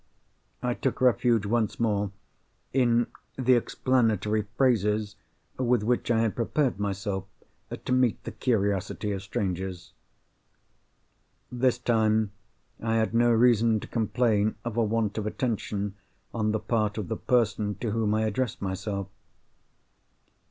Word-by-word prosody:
I 125 0 +1
took 130 +1 -2
refuge 120 -3 +3
once 110 0 0
more 105 -3 +1 0.6
in 120 -2 +3 0.3
the 130 -1 +4
explanatory 110 -4 +1
phrases 105 -5 +2 0.4
with 125 -3 +2
which 120 +2 0
I 115 -2 +3
had 115 -2 0
prepared 125 -1 0
myself 100 -1 -2 0.4
to - - -6
meet 125 -3 +2
the - - -5
curiosity 105 -3 -1
of 100 -1 -3
strangers. 95 -4 -4 1.6
This 125 0 +2
time 110 -3 +2 0.5
I 115 0 0
had 110 0 +1
no 120 +1 +4
reason 115 -1 +4
to - - -9
complain 110 -2 +1
of 120 -2 -3
a 120 - +2
want 110 -1 0
of 105 - -3
attention 105 -4 -2 0.4
on 110 -2 0
the 110 - 0
part 110 -2 0
of 105 -5 -3
the - - -3
person 105 -4 +1
to 110 +3 -3
whom 110 -1 +1
I 110 - +1
addressed 110 +2 -1
myself. 100 0 -3
110 Hz, 130 wpm, -27 LUFS, 105-120 Hz, 1.6 s, the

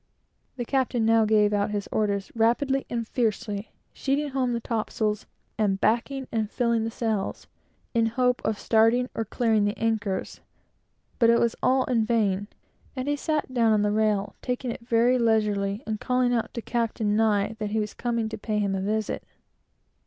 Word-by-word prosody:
The 245 -2 -4
captain 255 -3 0
now 225 0 +4
gave 210 -1 +3
out 205 0 +1
his 205 -1 -3
orders 200 -2 -1
rapidly 265 +4 +1
and 230 -2 -3
fiercely, 215 -3 -2 0.2
sheeting 285 +2 -1
home 260 -2 0
the 235 - -1
topsails, 220 -2 -2 0.3
and 195 -3 +1
backing 255 +5 0
and 220 -3 -1
filling 235 -2 +1
the - - -1
sails, 220 -3 -2 0.5
in 230 -2 +3
hope 250 +2 +1
of 220 - 0
starting 230 +4 +3
or 225 - -1
clearing 220 -1 +1
the 205 +1 -1
anchors; 215 -4 -2 0.8
but 230 -2 +5
it 235 - +5
was 235 0 +1
all 260 0 +3
in 240 -4 +1
vain, 205 -3 +1 0.5
and 260 +1 -4
he 290 - +1
sat 300 -2 -2
down 230 -3 +3
on 210 -1 +2
the 210 - +1
rail, 210 -1 +1
taking 250 -1 -2
it - - -7
very 235 +2 +3
leisurely, 210 -2 +1
and 215 -1 -3
calling 250 -1 +1
out 230 -2 -1
to 235 - -4
Captain 225 -3 -1
Nye, 215 -1 +2
that 210 -1 -2
he 220 +1 0
was 210 -1 -3
coming 235 -2 -1
to 220 -1 -6
pay 215 0 -2
him 200 -2 0
a 190 - -1
visit. 215 +2 -1
225 Hz, 180 wpm, -26 LUFS, 210-245 Hz, 0.8 s, but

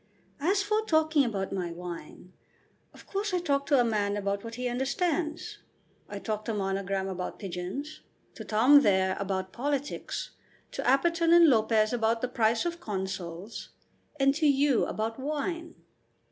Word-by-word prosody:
"And 305 +5 0
as 395 0 +2
for 425 +1 +1
talking 315 -5 +3
about 200 -6 -2
my 180 -3 -2
wine, 175 +1 -9 0.6
of - - -16
course 395 -1 -2
I - - +2
talk 280 -5 0
to 280 -4 +4
a - - +5
man 205 -3 0
about 200 0 -2
what 230 0 -7
he 250 +1 -2
understands. 310 +6 -2 0.5
I - - -5
talk 215 -1 -3
to 225 - -2
Monogram 195 -1 -1
about 185 -1 -4
pigeons, 195 - -6 0.3
to - - -8
Tom 250 +7 +6
there 190 -4 +2
about 190 -1 -3
politics, 285 +2 -3 0.4
to - - -4
Apperton 335 +5 +3
and 340 0 +8
Lopez 220 -2 +3
about 230 -1 +1
the 250 - 0
price 230 0 +1
of 340 0 -3
consols, 190 - -5 0.5
and 275 0 +4
to 310 +1 +2
you 280 -2 +3
about 225 +3 -3
wine. 310 +4 -3
235 Hz, 160 wpm, -28 LUFS, 195-300 Hz, 0.6 s, and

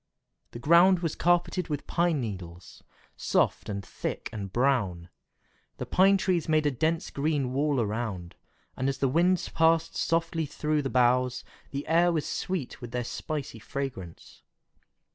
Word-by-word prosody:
The - - -9
ground 170 +7 +5
was 165 -3 -1
carpeted 175 +1 +1
with 145 -2 -4
pine 170 -3 +1
needles, 90 -7 -7 0.3
soft - - 0
and 100 -2 -4
thick - - -5
and 100 -3 -5
brown. 100 -9 0 0.7
The - - -4
pine 195 +2 +4
trees 180 -4 0
made 155 -1 +3
a 145 - +3
dense 160 +6 -1
green 140 -3 -1
wall 145 0 +1
around, 105 -5 -3 0.4
and 130 +2 -1
as 135 - -2
the 135 - +1
wind 175 +6 +2
passed 165 0 +2
softly 165 -1 0
through 150 +1 -1
the 135 - -3
boughs, 125 0 +2 0.3
the 140 +1 -5
air 170 +2 +4
was 160 -3 -1
sweet 175 -9 -4
with 120 - -7
their 125 +1 -2
spicy 140 -1 -5
fragrance. 115 -9 -7
140 Hz, 150 wpm, -28 LUFS, 120-165 Hz, 0.7 s, ground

